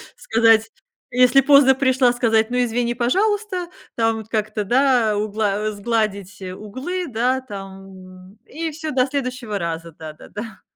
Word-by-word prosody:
сказать, 225 0 +3 0.4
если 250 +2 +5
поздно 275 -1 +6
пришла, 260 -2 +3
сказать: 225 -2 +2
"Ну, 250 - 0
извини, 240 0 -1
пожалуйста". 380 - 0 0.3
Там 225 -1 +1
вот 220 -1 -9
как-то, 215 -1 -2
да, 240 -2 +2
угла 210 -1 -1
э, - - -1
сгладить 205 -3 -2
углы, 260 - -5
да, 255 +3 0
там, 190 -3 -11
и 325 +2 -5
всё, 310 0 -5
до 255 0 +2
следующего 255 -6 -3
раза, 165 -1 -4
да-да-да. 160 +8 -10
225 Hz, 135 wpm, -21 LUFS, 205-260 Hz, 0.4 s, поздно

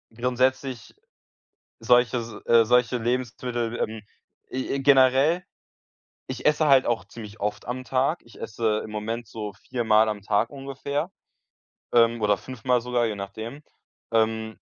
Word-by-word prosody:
grundsätzlich 125 +1 -1 0.8
solche 125 0 +3
s 115 -1 -5
äh, 115 -1 +5
solche 125 +1 +3
Lebensmittel 120 0 -2
ähm, 110 0 -3 0.5
e 130 +1 -3
e - - -1
generell, 135 +5 +4 0.9
ich 130 -1 -5
esse 150 +1 +3
halt 135 -2 +5
auch 115 -6 0
ziemlich 105 +1 -11
oft 105 +1 -3
am 130 +1 -4
Tag. 135 +6 0
Ich 120 - -16
esse 110 0 -1
im - - -8
Moment 110 +2 -4
so 105 -1 -6 0.2
viermal 110 -3 +3
am 105 -2 -3
Tag 105 +3 +1
ungefähr. 140 +1 -4 0.8
Ähm, 115 -1 +4
oder 105 -1 +3
fünfmal 125 +2 -1
sogar, 120 0 0
je 110 - -2
nachdem. 110 +8 -7 0.5
Ähm 110 -1 0
120 Hz, 140 wpm, -25 LUFS, 110-130 Hz, 0.9 s, äh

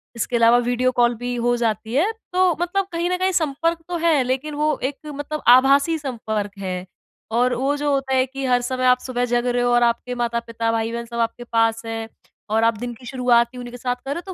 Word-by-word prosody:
इसके 230 +2 -2
अलावा 230 0 +5
video 245 +1 +1
call 240 -1 +3
भी 245 +2 -4
हो 240 0 +1
जाती 225 -1 -2
है। 350 +11 +2 0.2
तो 370 -1 +4
मतलब 380 +2 0
कहीं 340 +1 -1
न 365 - 0
कहीं 375 +1 +1
संपर्क 330 0 0
तो 350 -1 -2
है 320 -5 +3
लेकिन 265 +4 -2
वो 300 +1 +1
एक 275 +2 -2
मतलब 295 +1 -5
आभासी 275 +6 +5
संपर्क 220 -6 -3
है 185 -1 -4 0.5
और 245 +2 +2
वो 270 +4 0
जो 290 0 0
होता 270 -1 -1
है 255 - +3
कि 270 +1 -6
हर 245 -1 +2
समय 255 +1 -2
आप 250 0 +5
सुबह 245 -1 -2
जग 240 0 0
रहे 245 0 +1
हो 245 - +2
और 240 0 +4
आपके 240 +1 0
माता-पिता, 235 -1 -2
भाई-बहन 230 +1 -2
सब 235 0 -6
आपके 230 +1 -1
पास 225 -1 +1
हैं 225 0 -4 0.4
और 220 +1 +2
आप 230 -1 +2
दिन 240 +2 -5
की 245 +2 -15
शुरुआत 240 -2 +2
ही - - -10
उन्हीं 245 0 -7
के 245 - -8
साथ 245 0 -2
कर 270 +2 -8
रहे 340 - -5
हो। 380 - -5
245 Hz, 235 wpm, -22 LUFS, 235-280 Hz, 0.5 s, अलावा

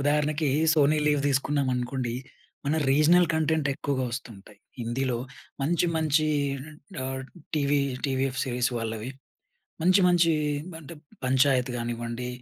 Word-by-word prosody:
ఉదాహరణకి 150 +1 +1 0.3
Sony 150 0 +4
leave 145 -1 +3
దీసుకున్నామనుకోండి, 130 -3 0 0.5
మన 150 +3 +1
regional 165 +5 +5
content 160 -2 +1
ఎక్కువగా 135 -1 -2
వస్తుంటయి. 115 -6 -8 0.2
హిందీలో 120 +1 -1 0.4
మంచి 170 +4 +2
మంచి 155 -1 +2 0.8
ఆహ్, 130 0 -4 0.3
టీవీ 145 -1 +2 0.3
టీవీఎఫ్ 135 -1 -1
సీరీస్ 125 -1 0
వాళ్ళవి. 115 +2 -4 0.7
మంచి 185 +3 +5
మంచి 170 -2 +4 0.5
అంటే, 165 +2 -10 0.3
పంచాయత్ 130 -1 +3
గానివ్వండి. 120 +1 -4
135 Hz, 105 wpm, -27 LUFS, 125-150 Hz, 0.8 s, regional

